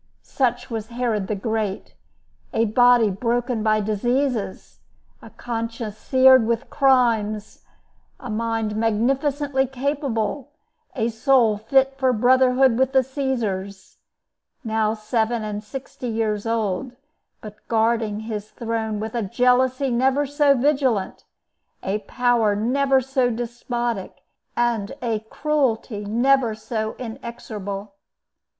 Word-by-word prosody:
Such 245 -2 -1
was 220 -1 -4
Herod 235 -4 -2
the 210 - -1
Great—a 220 +1 -4
body 240 -1 +4
broken 240 +3 -1
by 215 0 +2
diseases, 230 +1 -2 0.4
a - - -12
conscience 230 -2 -5
seared 260 -3 +5
with 235 +3 -2
crimes, 230 -6 +1 0.6
a 250 - -8
mind 225 -1 -2
magnificently 265 +5 0
capable, 270 -1 -2 0.4
a 230 -3 0
soul 235 -1 +3
fit 270 +5 +1
for 260 -1 +3
brotherhood 255 +1 +4
with 265 +1 +2
the 265 -1 +5
Caesars; 225 -8 -4 0.6
now 220 -1 0
seven 225 +1 -1
and 210 0 -4
sixty 255 +2 -7
years 220 -2 -1
old, 225 +2 -1 0.5
but 210 -1 -10
guarding 225 -2 +1
his 215 -1 -5
throne 225 -2 -3
with 220 +1 -5
a 235 - -1
jealousy 250 +5 +2
never 265 +4 +2
so 285 0 +3
vigilant, 260 -7 0 0.6
a 195 +3 -1
power 240 -4 +2
never 265 +5 +2
so 260 -1 +1
despotic, 240 -2 -4 0.3
and 235 -4 0
a 225 -3 0
cruelty 255 -8 -1
never 240 +1 +2
so 220 0 -4
inexorable. 220 -5 -7
235 Hz, 110 wpm, -22 LUFS, 215-260 Hz, 0.6 s, seared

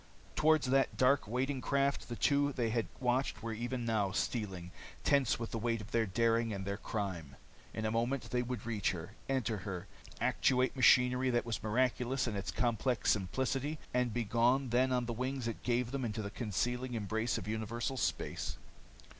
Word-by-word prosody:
Towards 155 -4 +3
that 135 0 +2
dark, 130 -2 +4
waiting 130 +4 -1
craft 140 -1 0
the 120 - -3
two 145 +2 +2
they 120 -4 0
had 115 -1 0
watched 125 0 0
were 115 -1 -2
even 120 +2 -3
now 110 -4 +1
stealing, 95 -6 -2 0.3
tense 140 -4 +3
with 115 -1 -5
the 115 - -2
weight 115 0 0
of 105 - -9
their 115 -2 +2
daring 115 +3 +2
and 100 -2 -4
their 100 0 -2
crime. 90 -11 -4 0.4
In 110 - -4
a 110 - +1
moment 120 +4 -1
they 125 - +2
would 120 -3 -4
reach 115 -1 0
her, 85 +2 -7 0.2
enter 125 -5 0
her, 95 -2 -5 0.3
actuate 130 +1 +2
machinery 125 0 +5
that 120 -1 +1
was 115 -2 -3
miraculous 125 +3 +1
in 115 -4 -2
its 100 - -3
complex 120 +1 +1
simplicity, 130 +9 -1 0.2
and 125 -1 +2
be 120 +1 -1
gone 120 +5 +2
then 130 +2 +3
on 125 -1 +1
the 120 - -3
wings 130 +1 -2
it 115 - -4
gave 120 0 0
them 135 -1 -2
into 110 -2 -2
the 100 - -5
concealing 125 +4 -2
embrace 110 +2 -1
of 105 -3 -6
universal 110 +4 -2
space. 130 - -2
120 Hz, 185 wpm, -34 LUFS, 110-130 Hz, 0.4 s, machinery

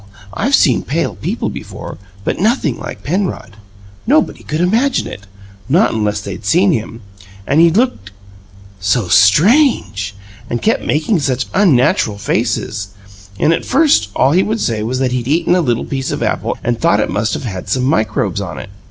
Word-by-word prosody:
I've - - +2
seen - - +3
pale - - -2
people - - -3
before, - - -8 0.2
but - - -2
nothing 195 - +1
like 100 - -8
Penrod. 180 - -3 0.5
Nobody 300 +5 +2
could 155 - -4
IMAGINE 225 +10 +1
it 100 - -9 0.4
not 175 +10 +3
unless 105 -2 -1
they'd 100 0 -7
seen 180 - +3
him! 115 -4 -3 0.4
And 145 +4 +3
he 170 - +6
looked, 180 - 0 0.7
so 100 +2 0
STRANGE, 110 - +3 0.3
and 120 - -2
kept 220 - +1
making 160 +6 0
such 135 -3 -1
unnatural 130 - +2
faces, 105 -2 -2 0.4
and 160 - +3
at - - -2
first 275 - +3
all 135 - +3
he 180 +5 +4
would 220 +3 -1
say 110 - -1
was 120 +4 -2
that 130 -1 0
he'd 125 -1 -2
eaten 165 +4 +2
a 180 - +3
little 120 -6 -1
piece 135 -1 -3
of - - -2
apple - - -2
and 120 -1 -1
thought 100 - +3
it - - 0
must 105 0 -1
have 95 -7 -6
some 125 +5 0
microbes 110 - 0
on 90 -7 -6
it. 65 +9 -8
125 Hz, 170 wpm, -16 LUFS, -, 0.7 s, he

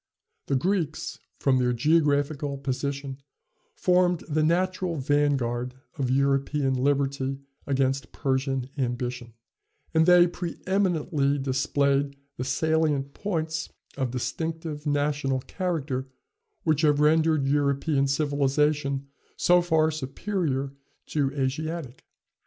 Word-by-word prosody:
The 140 - +1
Greeks, 165 +1 -1 0.2
from 130 -2 +3
their 125 -1 +2
geographical 145 +1 +1
position, 140 0 -3 0.6
formed 180 -2 +2
the 155 0 +1
natural 180 +2 +1
van 145 0 +2
guard 120 0 -3 0.2
of 135 -4 -1
European 135 +1 +1
liberty 135 0 0 0.3
against 135 -2 0
Persian 135 -2 -1
ambition; 120 -2 -3 0.6
and 160 +1 +4
they 180 -1 +8
preëminently 175 -5 0
displayed 140 +1 +1 0.2
the 125 - -2
salient 145 0 +1
points 160 -5 -2 0.3
of 130 -2 -1
distinctive 155 +4 -4
national 145 -2 0
character 150 -7 -3 0.6
which 155 -2 +2
have 150 -2 +3
rendered 155 -1 +3
European 140 0 +1
civilization 140 0 +1 0.3
so 180 0 +5
far 160 -2 +2
superior 140 -2 -2 0.3
to 140 -3 0
Asiatic. 140 0 -3
145 Hz, 100 wpm, -26 LUFS, 135-160 Hz, 0.6 s, they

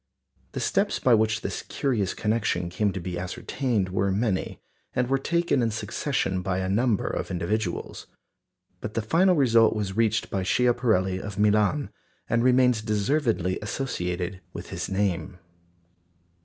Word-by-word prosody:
The - - -3
steps 200 +1 +1
by 125 - +3
which 110 -1 +2
this - - -4
curious 115 -9 -1
connection 105 -5 0
came 100 +2 +1
to 95 - -4
be 90 0 -4
ascertained 100 +3 -2
were 95 +1 0
many, 100 -1 -1 0.4
and 125 -1 +1
were 135 +1 +1
taken 170 -1 +1
in 115 - +2
succession 105 -2 -2
by 95 0 -1
a 95 0 -1
number 110 +2 +1
of - - -3
individuals. 90 +2 -3 0.7
But 105 - -6
the 115 - 0
final 180 - +3
result 115 -6 +4
was 100 -3 -3
reached 110 -1 +1
by 95 - -1
Schiaparelli 110 -4 +2
of 100 -2 -7
Milan, 105 +7 +2 0.4
and 115 +1 +1
remains 125 -2 +4
deservedly 110 - 0
associated 90 -6 -3
with - - -8
his - - -4
name. 95 -3 -1
105 Hz, 145 wpm, -26 LUFS, 95-125 Hz, 0.7 s, result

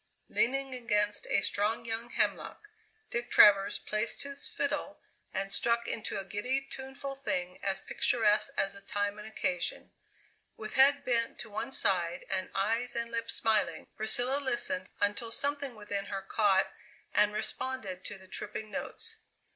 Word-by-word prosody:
Leaning 270 +2 +1
against 210 -4 +1
a 200 - +4
strong 210 +4 0
young 230 +1 -4
hemlock, 420 - -1 0.4
Dick 240 0 -2
Travers 200 -1 +7
placed 215 +2 -1
his 280 0 +2
fiddle - - -2 0.3
and 195 +1 -2
struck 235 +1 +1
into 220 -2 -2
a - - -5
giddy, 225 +7 -1
tuneful 270 +1 -6
thing 180 -10 -3
as 195 -1 +2
picturesque 215 -2 +2
as 195 0 +1
the 200 - -9
time 205 +1 -2
and 210 - -8
occasion. 180 -5 -1 0.7
With 215 0 -7
head 280 +1 +5
bent 235 -2 +1
to 220 - -10
one 215 +5 -3
side 175 -7 +1
and 190 -1 -1
eyes 225 +5 +1
and 235 0 -2
lips 230 0 -2
smiling, 210 -7 +1
Priscilla 245 +5 +2
listened 240 -8 0
until 205 +3 0
something 280 +1 0
within 205 -2 -4
her 195 -1 -5
caught 195 -1 +2 0.4
and 210 0 +4
responded 210 -3 -3
to 205 - -6
the 190 0 -16
tripping 210 +3 -5
notes. 450 +11 -3
215 Hz, 150 wpm, -31 LUFS, 200-245 Hz, 0.7 s, Travers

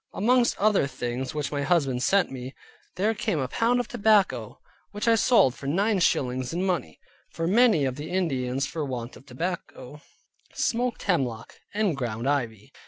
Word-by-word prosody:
Amongst 245 +3 +2
other 210 -8 +3
things 125 +1 -4
which 150 -2 -2
my 145 -1 -2
husband 140 -6 +1
sent 195 +6 +2
me, 130 0 -7 0.4
there 210 +4 +1
came 210 -4 -2
a 130 -3 -1
pound 235 - +1
of 245 - -2
tobacco, 205 - +1 0.3
which 205 +2 -4
I 230 - +6
sold 225 - +4
for 135 - -9
nine 200 +7 +1
shillings 130 -6 0
in 175 +3 -1
money; 175 - -2 0.3
for 165 - -3
many 210 - +4
of 130 -1 -2
the 150 +2 -6
Indians 135 -7 -1
for 155 +2 -4
want 125 -3 -5
of 135 - -16
tobacco, 150 -1 -6 0.5
smoked 240 +1 -1
hemlock, 130 - -1 0.2
and 205 -6 +1
ground 120 -2 -3
ivy. 115 -7 -2
150 Hz, 170 wpm, -26 LUFS, 130-205 Hz, 0.5 s, I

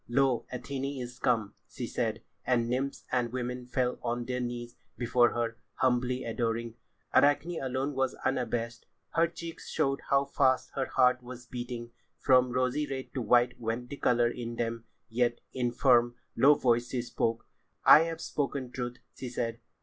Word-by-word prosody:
"Lo, 130 0 +2
Athené 135 +2 -4
is 125 0 -7
come!" 110 -4 +1 0.2
she - - -5
said, - - -2 0.2
and 120 -2 +2
nymphs 130 +3 -2
and 120 -2 +1
women 125 0 -4
fell 125 0 0
on 120 0 -2
their 125 +1 -2
knees 120 -1 -4 0.2
before 120 0 +3
her, 115 -1 -1 0.2
humbly 125 0 +1
adoring. 115 0 -2 0.4
Arachne 155 +4 +3
alone 135 +2 -1
was 135 -1 0
unabashed. 115 -2 -1 0.2
Her 165 +1 +3
cheeks 170 0 -8
showed 135 0 0
how 140 0 +4
fast 130 -2 +2
her 135 -1 -1
heart 125 -1 +3
was 125 0 -9
beating. 120 -1 -6 0.3
From 130 -1 +4
rosy 130 +4 0
red 130 -1 -5
to 130 - -2
white 120 +2 +3
went 120 +2 -3
the 140 - -5
colour 120 -3 +3
in 120 -1 -5
them, 115 0 -3 0.2
yet, 120 0 +1
in 125 -2 0
firm, 120 -1 +4 0.2
low 145 +2 +6
voice 120 -2 +2
she 125 -2 -2
spoke. 115 -1 -1 0.4
"I - - +10
have 165 -1 -4
spoken 135 -3 -2
truth," 125 0 -4 0.2
she 130 - -6
said. 115 -1 -3
125 Hz, 165 wpm, -30 LUFS, 120-130 Hz, 0.4 s, I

